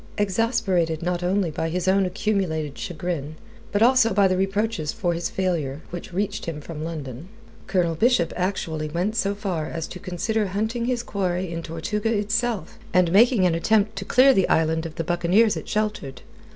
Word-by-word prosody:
Exasperated 195 -6 +1
not 175 0 -1
only 180 -1 +1
by 160 +2 -2
his 180 +2 -2
own 190 0 +3
accumulated 180 -7 -1
chagrin, 165 -5 -4 0.4
but 205 +2 +3
also 240 -4 +4
by 200 -1 +5
the 185 - +1
reproaches 195 -3 -1
for 175 -2 -1
his 170 0 -2
failure 160 -7 -2
which 175 +1 -7
reached 200 +2 -2
him 160 -3 -4
from 155 +1 -7
London, 150 -3 -6 0.4
Colonel 180 -4 +1
Bishop 180 -2 +2
actually 165 -5 -2
went 180 +7 -1
so 200 -2 0
far 185 -7 -3
as 165 -1 -4
to 180 - -8
consider 205 +5 -1
hunting 220 +5 -2
his 245 -1 -1
quarry 185 -4 -2
in 165 0 -4
Tortuga 205 +7 -2
itself 215 -2 -1
and 180 -2 +3
making 220 0 +5
an 175 - +3
attempt 215 +5 +2
to 195 - -3
clear 260 +6 +5
the 190 - +2
island 160 0 +2
of 160 - -12
the 165 - -2
buccaneers 175 +6 +3
it - - -7
sheltered. 210 -12 -2
185 Hz, 180 wpm, -24 LUFS, 165-210 Hz, 0.4 s, by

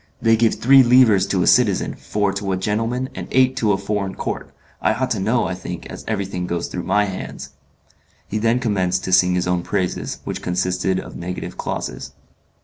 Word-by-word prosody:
They 115 0 +4
give 115 0 +2
three 135 +2 +6
livres 120 -6 +5
to 95 -2 +1
a - - +1
citizen, 110 -7 +3
four 105 -2 -1
to 100 -1 -3
a - - 0
gentleman, 115 +6 -1
and - - -6
eight 130 0 +3
to 110 -4 +2
a 95 - +2
foreign 100 -1 -3
count. - - -4 0.3
I - - +2
ought 130 +2 -2
to 110 - 0
know, 115 +4 +1
I 95 - -2
think, 90 -1 -7
as - - -8
everything 95 -2 -2
goes 85 -1 -2
through 90 - -4
my 105 0 +2
hands." 95 -2 -6 0.8
He 110 - -2
then 115 +2 +2
commenced 95 -6 0
to 95 - -2
sing 90 -1 +5
his 90 - 0
own 90 -1 +1
praises, 90 +1 -2
which - - -5
consisted 90 +1 0
of - - -9
negative 90 +1 -6
clauses. - - -5
100 Hz, 200 wpm, -21 LUFS, 90-115 Hz, 0.8 s, three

